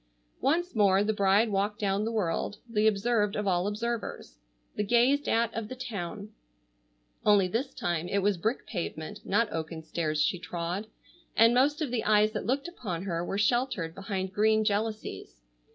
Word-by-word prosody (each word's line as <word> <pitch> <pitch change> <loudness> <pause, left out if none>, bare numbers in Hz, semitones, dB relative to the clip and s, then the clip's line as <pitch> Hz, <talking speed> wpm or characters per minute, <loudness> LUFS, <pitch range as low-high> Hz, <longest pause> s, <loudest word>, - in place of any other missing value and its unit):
Once 340 +4 +1
more 200 -2 +4
the 220 +1 +1
bride 200 +2 +3
walked 205 +1 0
down 200 0 0
the 225 - -1
world 205 -1 -1
the 215 -2 +2
observed 210 0 +1
of 210 - -2
all 180 -1 +1
observers, 230 - -4 0.4
the 210 - 0
gazed 245 +7 +3
at 230 0 +2
of 225 -1 -4
the 255 - -7
town, 210 -5 -5 0.9
only 205 -3 +5
this 245 +8 -2
time 175 -7 -2
it 195 - -1
was 205 0 +3
brick 220 +9 -2
pavement 170 -5 -5
not 210 +3 +1
oaken 160 0 -4
stairs 155 -1 -2
she 150 +4 +1
trod, 175 +4 -4 0.5
and 230 +1 +6
most 290 +5 +3
of 275 - -3
the 240 -3 -1
eyes 215 0 +4
that 210 -2 -4
looked 275 +5 0
upon 195 - -5
her 170 -3 -2
were 195 - -3
sheltered 210 -6 +1
behind 190 -1 -4
green 215 +2 +3
jalousies. 210 - -3
210 Hz, 170 wpm, -29 LUFS, 185-230 Hz, 0.9 s, and